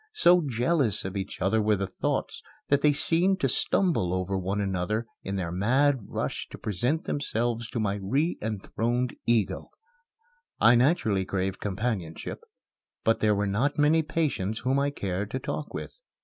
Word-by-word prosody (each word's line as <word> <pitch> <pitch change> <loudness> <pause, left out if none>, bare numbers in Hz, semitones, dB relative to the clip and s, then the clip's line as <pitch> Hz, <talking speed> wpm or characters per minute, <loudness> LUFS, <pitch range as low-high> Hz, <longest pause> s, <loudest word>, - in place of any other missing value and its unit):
So 180 - +5
jealous 125 - +1
of 95 +1 -4
each 95 -1 -4
other 110 +4 +2
were 105 0 +3
the 100 0 -2
thoughts 95 - -2 0.3
that 140 0 +3
they 150 - +5
seemed 175 +6 +2
to - - +3
stumble 125 - +1
over 95 +1 -1
one 95 +2 -1
another 100 +3 -1 0.2
in 95 - -4
their 90 -3 -2
mad 130 +9 +2
rush - - -3
to - - -9
present 120 - -1
themselves 120 -4 -2
to 120 - -3
my 100 -2 0
re 140 - +1
enthroned 115 +3 -2
ego. 115 -5 +1 0.9
I 115 +2 +7
naturally 120 - +3
craved 95 0 -2
companionship, 100 -5 -3 0.6
but 115 - +2
there 105 -1 +3
were 100 +1 0
not 120 +9 0
many 150 +2 +4
patients 145 - -1
whom 130 +3 +1
I 140 0 +1
cared 100 -6 -3
to 130 - -3
talk 145 +3 -4
with. - - -6
110 Hz, 165 wpm, -27 LUFS, 100-140 Hz, 0.9 s, I